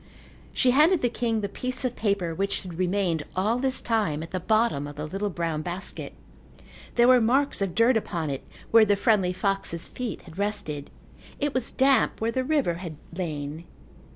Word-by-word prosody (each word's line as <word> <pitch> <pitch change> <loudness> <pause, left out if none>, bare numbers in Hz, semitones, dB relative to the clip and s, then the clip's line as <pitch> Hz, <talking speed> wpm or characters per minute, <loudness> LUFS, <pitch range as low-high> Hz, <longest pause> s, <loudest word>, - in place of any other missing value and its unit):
She 255 - +3
handed 310 +5 +4
the 245 - +3
king 230 -3 -1
the 200 - -1
piece 255 +5 -2
of 250 - -1
paper 200 -6 0
which 195 +4 -1
had 180 -3 -9
remained 180 -3 +1
all 215 +6 +1
this 260 0 0
time 205 -10 0
at 165 - -9
the 185 - -2
bottom 215 -7 +1
of 145 - -9
the 150 +1 -4
little 195 +6 -2
brown 165 -4 -2
basket. 180 +4 -4 0.8
There 240 0 +5
were 255 -1 +6
marks 265 +2 +2
of 190 -3 -1
dirt 230 +3 +4
upon 170 -8 -1
it 135 - -4 0.3
where 225 -1 +8
the 205 -1 +3
friendly 200 -3 +2
fox's 190 -3 -2
feet 250 -2 -5
had 170 +2 -12
rested. 200 -9 -2 0.5
It 290 -1 0
was 255 -2 0
damp 270 0 +3
where 225 +1 0
the 260 +2 -1
river 280 - +1
had 170 -4 -6 0.2
lain. 155 -2 -4
200 Hz, 185 wpm, -26 LUFS, 170-240 Hz, 0.8 s, where